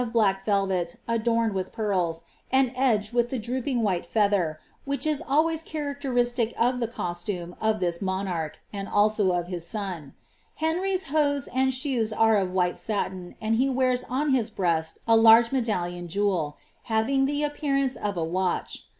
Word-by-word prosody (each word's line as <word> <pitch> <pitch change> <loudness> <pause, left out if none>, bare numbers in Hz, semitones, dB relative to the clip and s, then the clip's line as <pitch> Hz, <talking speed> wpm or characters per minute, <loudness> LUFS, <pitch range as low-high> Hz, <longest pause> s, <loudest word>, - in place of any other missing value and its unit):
black 195 -4 +2
velvet 190 -4 0
adorned 230 -1 +1
with 190 -1 -3
pearls, 185 -6 -1 0.3
and 265 -1 +3
edged 235 -4 +1
with 240 0 +2
the 260 - -2
droopinj^ 245 +1 -2
wbill 185 -5 0
feather, 200 -8 +1 0.2
which 280 +2 -2
is 305 -2 +1
always 315 +3 +2
characteristic 260 -6 -1
of 250 +2 +2
the 235 - 0
costume 175 -4 -4
of 220 -1 +1
this 175 -2 -1
monarch, 190 -5 -2 0.2
and 200 -1 -4
aUo 205 -3 +2
of 175 - -5
his 175 -2 -5
son. 180 -8 -5 0.4
lienrv^s 365 +3 0
hose 285 -2 +1
and 265 +1 +1
shoes 255 -4 0
are 225 0 +4
of 190 -2 0
white 180 -1 0
satin, 190 -4 -3
and 220 +1 0
he 265 +3 +2
wears 255 -1 +1
on 275 +4 0
his 240 -4 +1
breast 165 -6 0
a 230 - +6
large 225 +1 +7
medallion 175 -9 -1
jeweU 175 -5 0 0.3
having 245 +5 +2
the 290 +2 -1
appearance 275 -3 0
of 205 -1 -3
t 170 - -2
watch. 180 +3 -2
220 Hz, 160 wpm, -26 LUFS, 185-260 Hz, 0.4 s, large